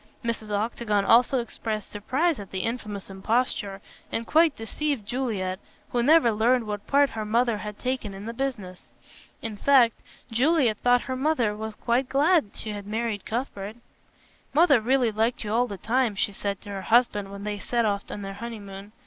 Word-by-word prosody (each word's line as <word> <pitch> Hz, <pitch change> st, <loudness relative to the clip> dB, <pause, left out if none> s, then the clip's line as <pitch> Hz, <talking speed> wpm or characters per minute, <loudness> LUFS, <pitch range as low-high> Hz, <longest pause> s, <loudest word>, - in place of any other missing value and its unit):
Mrs. 230 Hz, -2 st, -3 dB
Octagon 210 Hz, -1 st, 0 dB
also 245 Hz, +4 st, +5 dB
expressed 220 Hz, -3 st, -4 dB
surprise 270 Hz, +9 st, 0 dB
at 200 Hz, -, -8 dB
the 190 Hz, -, -3 dB
infamous 215 Hz, -4 st, -4 dB
imposture, 200 Hz, -1 st, -1 dB, 0.3 s
and 230 Hz, -, -2 dB
quite 320 Hz, +3 st, +4 dB
deceived 260 Hz, +1 st, -3 dB
Juliet, 205 Hz, -7 st, -2 dB, 0.3 s
who 240 Hz, -, +1 dB
never 295 Hz, -1 st, +5 dB
learned 230 Hz, +3 st, +2 dB
what 210 Hz, -1 st, -5 dB
part 285 Hz, 0 st, +4 dB
her 220 Hz, -, -4 dB
mother 230 Hz, +1 st, +1 dB
had 210 Hz, 0 st, -6 dB
taken 250 Hz, -6 st, -3 dB
in 195 Hz, +2 st, -8 dB
the 230 Hz, -, -4 dB
business. 230 Hz, -9 st, -4 dB, 0.6 s
In 225 Hz, -2 st, -3 dB
fact 250 Hz, -2 st, +4 dB, 0.3 s
Juliet 255 Hz, -2 st, +3 dB
thought 245 Hz, 0 st, +4 dB
her 260 Hz, -, -4 dB
mother 255 Hz, -6 st, +1 dB
was 220 Hz, 0 st, -6 dB
quite 250 Hz, +4 st, 0 dB
glad 295 Hz, -, +3 dB
she 215 Hz, -, -5 dB
had 205 Hz, -1 st, -7 dB
married 220 Hz, -1 st, -2 dB
Cuthbert. 220 Hz, -3 st, -4 dB, 0.8 s
"Mother 295 Hz, -6 st, +6 dB
really 250 Hz, 0 st, +2 dB
liked 225 Hz, +3 st, 0 dB
you 210 Hz, 0 st, -3 dB
all 245 Hz, +2 st, +3 dB
the 200 Hz, -, -6 dB
time," 230 Hz, +1 st, +1 dB
she 200 Hz, 0 st, 0 dB
said 200 Hz, 0 st, -3 dB
to 205 Hz, -, -11 dB
her 195 Hz, -1 st, -4 dB
husband 210 Hz, -2 st, +2 dB
when 200 Hz, 0 st, -8 dB
they 210 Hz, 0 st, -3 dB
set 235 Hz, +2 st, 0 dB
off 200 Hz, -1 st, -1 dB
on 205 Hz, -, -6 dB
their 195 Hz, 0 st, -5 dB
honeymoon. 205 Hz, -2 st, -8 dB
225 Hz, 180 wpm, -26 LUFS, 205-250 Hz, 0.8 s, Mother